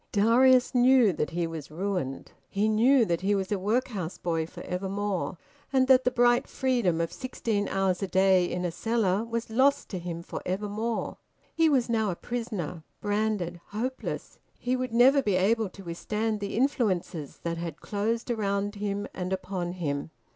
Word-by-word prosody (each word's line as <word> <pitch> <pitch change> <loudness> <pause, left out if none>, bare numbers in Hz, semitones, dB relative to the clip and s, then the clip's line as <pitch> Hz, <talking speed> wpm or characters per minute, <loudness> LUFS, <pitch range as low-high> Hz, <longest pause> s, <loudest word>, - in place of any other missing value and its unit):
Darius 250 +5 +5
knew 250 -4 +5
that 150 - -2
he 170 0 -1
was 165 -3 -6
ruined; 170 -5 -3 0.2
he 205 +2 +1
knew 230 +4 +4
that 170 -3 -1
he 200 +2 +2
was 190 0 -2
a 205 - +1
workhouse 205 -4 -1
boy 165 -2 -1
for - - -10
evermore, 190 0 -2 0.3
and 260 -1 +3
that 260 -1 +5
the - - +5
bright 240 0 +3
freedom 240 -11 +1
of 165 0 -1
sixteen 225 -5 -2
hours 195 -1 0
a 195 - -1
day 190 -1 +4
in 180 +1 -2
a 175 - -1
cellar 215 +1 0
was 230 -1 -4
lost 265 +5 +3
to 185 - -4
him 170 -1 -5
for - - -6
evermore. 210 +4 -2 0.4
He 325 -1 +4
was 260 -5 +2
now 220 -3 +1
a 180 - -2
prisoner, 200 -9 -4 0.2
branded, 205 -5 -1
hopeless. 250 +5 -4 0.2
He 250 +1 -1
would 255 -1 -3
never 260 +4 +6
be 205 -7 +1
able 210 +3 +2
to 195 +2 -12
withstand 210 +5 -2
the 200 +1 -4
influences 195 - 0
that 170 0 -2
had 165 -2 -5
closed 225 +4 -2
around 205 -2 -1
him 205 -1 -3
and 180 0 -4
upon 185 -2 -3
him. 145 -5 -3
205 Hz, 175 wpm, -28 LUFS, 180-235 Hz, 0.4 s, never